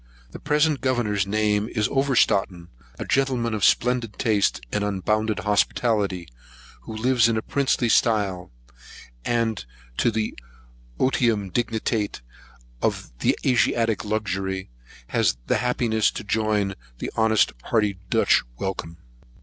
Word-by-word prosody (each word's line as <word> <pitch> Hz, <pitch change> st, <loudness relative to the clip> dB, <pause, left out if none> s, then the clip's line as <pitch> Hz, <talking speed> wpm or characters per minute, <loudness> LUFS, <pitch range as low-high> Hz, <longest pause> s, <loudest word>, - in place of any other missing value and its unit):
The -, -, -9 dB
present 150 Hz, 0 st, +1 dB
governor's 110 Hz, -7 st, 0 dB
name 105 Hz, +1 st, +1 dB
is 105 Hz, -3 st, 0 dB
Overstraaten, 105 Hz, -10 st, +1 dB, 0.3 s
a -, -, -5 dB
gentleman 130 Hz, -4 st, +1 dB
of 105 Hz, -, -2 dB
splendid 120 Hz, -3 st, +2 dB
taste 105 Hz, -5 st, +1 dB
and 105 Hz, -, 0 dB
unbounded 105 Hz, +2 st, 0 dB
hospitality, 105 Hz, -3 st, +1 dB, 0.5 s
who 110 Hz, -, -8 dB
lives 120 Hz, 0 st, +3 dB
in 115 Hz, -, +1 dB
a 110 Hz, -, -2 dB
princely 135 Hz, -3 st, +1 dB
style; 105 Hz, -5 st, +1 dB, 0.7 s
and 115 Hz, -3 st, 0 dB, 0.3 s
to -, -, +3 dB
the 110 Hz, -1 st, -2 dB, 0.6 s
otium 115 Hz, -7 st, +1 dB
dignitate 110 Hz, -, -1 dB, 0.6 s
of -, -, -1 dB, 0.3 s
Asiatic 115 Hz, -3 st, +2 dB
luxury, 95 Hz, -, -3 dB, 0.4 s
has -, -, +1 dB
the -, -, +1 dB
happiness 120 Hz, -3 st, +1 dB
to -, -, -6 dB
join 105 Hz, -2 st, 0 dB, 0.3 s
an -, -, -3 dB
honest 110 Hz, -2 st, +3 dB
hearty 105 Hz, -4 st, +1 dB
Dutch -, -, +4 dB, 0.2 s
welcome. 85 Hz, -2 st, -4 dB
110 Hz, 115 wpm, -24 LUFS, 100-120 Hz, 0.7 s, Dutch